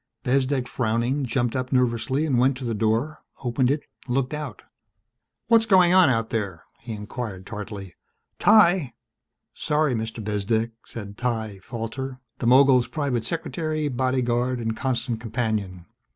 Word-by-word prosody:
Bezdek, 130 0 +1
frowning, 120 +4 0
jumped 120 -1 0
up 130 0 -2
nervously 125 +3 +1
and 135 -6 +2
went 130 +1 +3
to 130 - -6
the 115 - -1
door, 115 +8 0 0.2
opened 125 +1 +1
it, 145 +2 0 0.2
looked 130 +2 0
out. 150 -8 -6 0.8
"What's 230 -1 +4
going 185 -4 +6
on 185 -6 +7
out 115 -2 0
there?" 100 -7 -3 0.2
he 115 -1 -7
inquired 105 -2 -6
tartly. 105 -3 -7 0.5
"Ty!" 180 - +5 0.6
"Sorry, 150 -2 +1
Mr. 110 -1 -4
Bezdek," 110 +2 0
said 100 -2 -8
Ty 110 -5 -2
Falter, 125 +4 -5 0.2
the 120 - -1
mogul's 130 0 +6
private 135 -7 -2
secretary, 155 -1 -2
bodyguard 125 -1 0
and 115 -1 -2
constant 120 -2 -2
companion. 110 -6 -2
125 Hz, 135 wpm, -24 LUFS, 110-135 Hz, 0.8 s, on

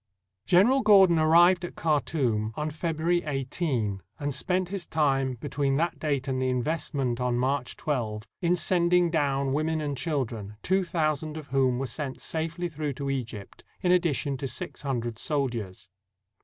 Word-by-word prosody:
] 100 +2 -56
General 240 +10 +6
Gordon 195 -6 +6
arrived 170 +3 +5
at 175 - -6
Khartoum 130 -8 0
on 150 +1 -2
February 165 +2 0
18, 135 - -2 0.2
and 145 -1 -2
spent 180 +5 -1
his 195 -2 -5
time 135 -4 +1
between 135 +2 -1
that 165 +3 0
date 140 -4 -1
and 130 -1 -1
the 130 - +1
invest 145 +5 -2
ment 125 -3 -1
on 125 -1 +1
March 130 +1 -1
12, 110 -8 -2 0.2
in 175 0 +3
sending 175 0 +3
down 140 -4 +1
women 155 +2 0
and 145 -2 -2
children, 120 -8 -3
two 190 +1 +2
thousand 155 -3 -1
of 150 -2 -9
whom 130 -2 +2
were 135 - -2
sent 130 +2 -4
safely 165 +2 -2
through 155 -3 -4
to 140 +1 -3
Egypt, 115 -6 -6 0.2
in 180 - +3
addition 155 -6 +1
to 135 +1 -4
six 120 - -4
hundred 120 -5 -3
soldiers. 120 -11 -3
145 Hz, 165 wpm, -27 LUFS, 130-165 Hz, 0.2 s, General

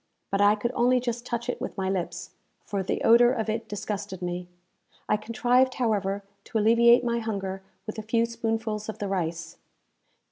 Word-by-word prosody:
But 195 0 +1
I 205 +1 +6
could 235 +3 -2
only 250 +1 +3
just 240 0 -4
touch 235 0 -3
it 245 - -3
with - - -5
my 190 -1 -1
lips, 175 -2 -3 0.3
for 200 -1 -2
the 190 - -2
odour 240 +1 +6
of 225 -3 -2
it 225 +1 -2
disgusted 200 -2 -4
me. 175 0 -3 0.6
I - - +3
contrived, 245 +4 +2
however, 205 -4 0 0.2
to - - -2
alleviate 235 +3 +5
my 235 -1 0
hunger 195 -4 -3 0.2
with 215 0 -5
a - - -2
few 230 +2 +1
spoonfuls 225 -2 -3
of 220 - -5
the 205 -3 -3
rice. 170 -3 -3
220 Hz, 180 wpm, -27 LUFS, 195-235 Hz, 0.6 s, I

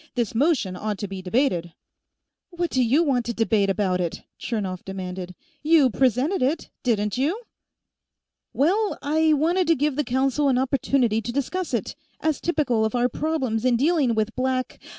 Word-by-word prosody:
"This 235 -5 -1
motion 240 - +1
ought 210 +2 -3
to 205 - -4
be 195 -1 -6
debated 180 - 0 0.4
" - - -60
"What 345 -1 -1
do 260 - +2
you 270 +8 +3
want 265 -6 +1
to 235 - -3
debate 220 -3 +2
about 190 -2 0
it?" 170 -2 -4 0.2
Chernov 195 -6 -3
demanded. 185 -1 -6 0.3
"You 300 -4 +4
presented 260 - +1
it, 285 +6 -1
didn't 210 -2 0
you?" 340 - -1 1.1
"Well, 395 +10 +1
I 315 +2 +3
wanted 335 +5 +1
to 330 - +4
give 290 0 0
the 295 - +1
Council 270 +3 +1
an 255 - +2
opportunity 255 -3 +1
to 230 +2 -4
discuss 290 +7 -2
it, 235 -6 -2 0.2
as 315 -2 -1
typical 285 -9 +1
of 220 +3 -1
our 245 0 +2
problems 260 -6 -1
in 255 -1 +3
dealing 280 -3 +2
with 215 +1 -1
Black 255 0 -2
255 Hz, 170 wpm, -24 LUFS, 215-295 Hz, 1.1 s, You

